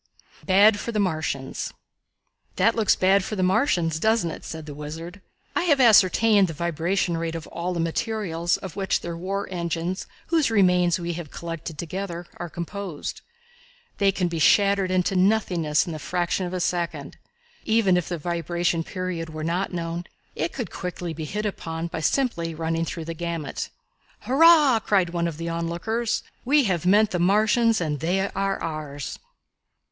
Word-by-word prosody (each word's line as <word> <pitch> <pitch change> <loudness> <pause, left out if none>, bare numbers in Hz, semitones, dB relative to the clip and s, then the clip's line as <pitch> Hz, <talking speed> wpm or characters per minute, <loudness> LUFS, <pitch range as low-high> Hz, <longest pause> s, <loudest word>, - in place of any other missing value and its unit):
Bad 205 +2 +6
for 235 - -4
the 220 - -3
Martians. 155 -8 -2 0.8
"That 225 - +3
looks 220 -4 +3
bad 190 +1 +3
for 215 - -4
the 185 - 0
Martians, 180 - +2
doesn't 220 -4 +2
it?" - - -9
said 160 -1 -7
the 150 - -7
Wizard. 160 +6 -8 0.3
"I - - +1
have 290 -5 +4
ascertained 215 -3 +5
the 165 - -6
vibration 170 +2 0
rate 165 0 -3
of 165 - -5
all 175 +2 -4
the - - -2
materials 170 -1 -1
of 190 -1 -8
which 195 -2 0
their 170 -1 -5
war 195 +4 -3
engines 170 +1 -3 0.2
whose 320 -5 +3
remains 180 -5 +3
we 175 0 -3
have 165 -3 -6
collected 165 -1 -6
together 175 +1 -5
are 175 - -5
composed. 170 0 -5 0.8
They 200 -1 +4
can 185 -2 -1
be 170 -1 -3
shattered 195 +4 +4
into 185 +1 +1
nothingness 180 -6 +2
in 170 - -5
the 155 - -5
fraction 180 +2 -1
of 175 - -7
a - - -1
second. 175 -1 -2 0.5
Even 220 -4 +3
if 180 -2 -1
the 175 - -2
vibration 170 +1 -1
period 180 -3 -4
were 155 0 -6
not 175 +4 -1
known, 170 0 -4 0.3
it 160 +3 -1
could 245 -4 -5
quickly 180 -2 -5
be 160 0 -5
hit 210 +6 -3
upon 165 -5 -4
by 170 -1 -4
simply 170 - 0
running 165 +1 -1
through 165 -1 -5
the 165 - -4
gamut." 170 -1 -4 0.5
"Hurrah!" 295 -3 +6
cried 190 -5 +1
one 170 -1 0
of 165 -3 -5
the 165 0 -4
onlookers. 170 +8 -2 0.2
"We 285 +3 +4
have 180 -6 0
met 210 +3 +5
the 180 - -1
Martians 215 +5 +3
and 150 -4 -2
they 190 +5 0
are 195 0 -1
ours." 150 -3 -5
175 Hz, 170 wpm, -24 LUFS, 165-200 Hz, 0.8 s, Bad